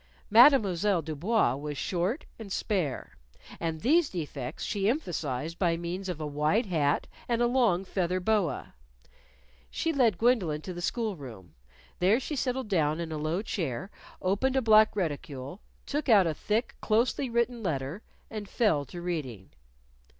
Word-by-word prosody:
Mademoiselle 210 - +5
Du 155 0 -5
Bois 190 - +2
was 145 +1 -5
short 185 - -1
and 210 -3 -8
spare. 150 - -2 0.4
And 160 -2 -3
these 315 - +3
defects 145 -7 -5
she 205 -1 0
emphasized 165 - -3
by 170 -3 +2
means 180 +3 -4
of 175 -4 -4
a 155 - -3
wide 150 - +1
hat 155 -7 +1 0.2
and 235 -1 +1
a 240 - +3
long 235 -7 +2
feather 185 -1 -1
boa. 185 -7 0 1.0
She 325 - -1
led 235 - +3
Gwendolyn 195 -11 +2
to 185 - -5
the 175 - -6
school 220 +2 -1
room. 115 - -11 0.5
There 195 +7 +4
she 295 +3 -4
settled 260 -2 -1
down 160 -5 +1
in 165 -1 -4
a 155 - -3
low 160 +6 -1
chair, 180 - -3 0.3
opened 205 +8 +1
a 265 - +3
black 215 -1 +6
reticule, 145 -3 -4 0.2
took 290 -1 -2
out 205 -5 +7
a 165 - 0
thick, 215 +9 -1
closely 240 +4 +1
written 235 0 0
letter, 155 0 -3 0.3
and 210 -2 -6
fell 165 - +2
to 175 +6 -8
reading. 130 - -4
185 Hz, 155 wpm, -29 LUFS, 155-225 Hz, 1.0 s, out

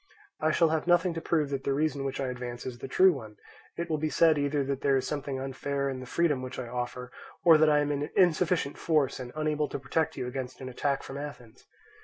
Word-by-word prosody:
I 155 - +2
shall 165 +1 +3
have 160 +1 -1
nothing 175 0 +4
to 165 - -4
prove 155 -4 0
that 135 -1 -2
the 135 0 0
reason 145 -1 0
which 135 -1 -3
I 135 -2 -1
advance 120 -1 -6
is 125 -2 -6
the 135 - -6
true 185 +7 +5
one; 110 -7 -9 0.4
it 170 - -2
will 155 -2 -1
be 155 +1 0
said 160 -1 +4
either 145 0 +1
that 135 0 -3
there 140 -1 +3
is 130 - -1
something 140 -1 -3
unfair 140 +1 -2
in 130 - -5
the 130 - -8
freedom 150 -3 +1
which 130 0 -6
I 130 - -4
offer, 125 +1 -5 0.3
or 165 -3 +7
that 155 0 +5
I 150 -1 +4
am 145 0 0
in 145 0 -2
insufficient 175 -4 +2
force 150 -6 +1
and 125 -1 -7
unable 155 -1 0
to - - -3
protect 160 +4 -1
you - - -2
against 125 0 -5
an 130 - -6
attack 140 +2 -1
from 135 +1 -7
Athens. 125 -5 -9
140 Hz, 245 wpm, -29 LUFS, 130-155 Hz, 0.4 s, or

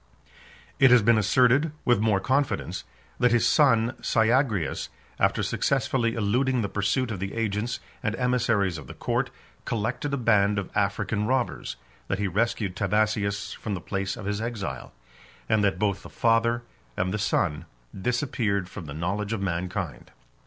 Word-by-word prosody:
16 - - -27 0.4
It 135 - +7
has 125 -1 +7
been 115 +1 +5
asserted, 125 +8 +3
with 120 -4 +4
more 105 -2 +2
confidence, 135 +7 -1 0.3
that 125 -1 +4
his 120 -1 +3
son 120 -5 +4
Syagrius, 110 - +1 0.3
after - - +2
successfully 115 -3 0
eluding 120 +3 +1
the 100 - -2
pursuit 110 +5 0
of 100 - -4
the 100 +3 -4
agents 115 +1 -1 0.2
and 105 0 -1
emissaries 115 -8 +1
of 70 - -11
the - - -9
court, - - -1 0.3
collected 115 +6 -2
a 140 - 0
band 105 -4 +3
of 100 - -3
African 105 +1 0
robbers; 125 - -1 0.3
that 100 - -1
he 100 0 0
rescued 105 -1 0
Timasius 100 0 0
from 105 - -4
the - - -4
place 95 +1 -3
of 105 - -7
his 105 +1 -2
exile; 105 - -4 0.6
and 110 -1 +2
that 100 -2 +2
both 100 0 0
the - - -11
father 115 +1 +2 0.3
and 90 +1 0
the 105 - -1
son 85 -5 0 0.3
disappeared 105 -3 -1
from 90 -2 -8
the 70 -1 -7
knowledge 100 +6 -2
of 110 - -2
mankind. 90 -3 -3
105 Hz, 160 wpm, -26 LUFS, 100-120 Hz, 0.6 s, It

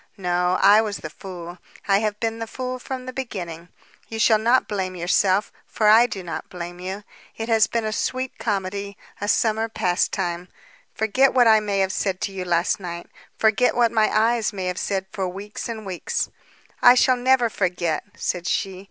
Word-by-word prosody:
"No; 180 -1 +1
I 205 +2 +7
was 210 -2 -3
the 155 - -8
fool. 175 -2 -9 0.3
I 195 0 +4
have 210 -1 -2
been 225 0 -2
the 225 - -4
fool 255 +2 -5
from 255 0 -6
the 255 - -6
beginning. 175 -10 -6 0.4
You 225 - -6
shall 220 0 +4
not 240 +4 +3
blame 190 -3 -3
yourself, 185 +3 +1 0.2
for 215 - 0
I 230 +3 +7
do 195 -5 -6
not 165 -2 -6
blame 175 0 -7
you. 190 +3 -5 0.3
It 225 +1 -4
has 220 -1 +4
been 230 -1 -2
a 215 - -1
sweet 255 +3 -3
comedy, 200 -1 -3 0.2
a 205 - -2
summer 220 +1 +1
pastime. 180 -2 -1 0.5
Forget 255 +6 +2
what 245 -2 +6
I 220 -1 +7
may 205 -2 -2
have 190 0 +1
said 190 -2 -1
to 200 - -2
you 190 -1 -5
last 175 +1 +1
night, 175 -2 -7 0.3
forget 225 +3 +3
what 235 -2 +3
my 220 -2 +3
eyes 225 +1 +2
may 190 -3 -5
have 180 0 -2
said 190 -1 -2
for 190 -2 -2
weeks 200 +5 -7
and 220 -2 -6
weeks." 185 -3 -3 0.5
"I 245 0 +8
shall 255 0 +4
never 250 0 +3
forget," 180 -6 -1 0.2
said 175 -1 -2
she. 195 -4 -1
205 Hz, 190 wpm, -23 LUFS, 185-225 Hz, 0.5 s, I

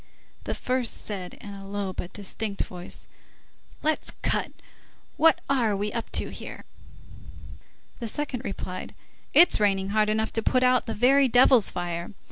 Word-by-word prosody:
The - - -2
first 250 -2 -1
said 190 -4 -5
in 205 - -10
a 195 0 -9
low 200 -1 -3
but 180 - -6
distinct 205 +1 -3
voice:— 180 -1 -7 0.8
"Let's 310 0 0
cut. - - +1 0.6
What 320 0 +5
are 240 -7 +2
we 205 +1 -2
up 230 - -3
to - - 0
here?" - - -9 1.3
The 235 - -4
second 265 0 -3
replied: 185 -4 -6 0.4
"It's 350 - +6
raining 195 -2 +2
hard 215 +1 +2
enough 220 +1 0
to 225 - 0
put 255 +3 +2
out 250 -1 +3
the 225 - -3
very 265 +5 +5
devil's 245 -2 +5
fire. 175 -1 -4
215 Hz, 150 wpm, -26 LUFS, 195-255 Hz, 1.3 s, It's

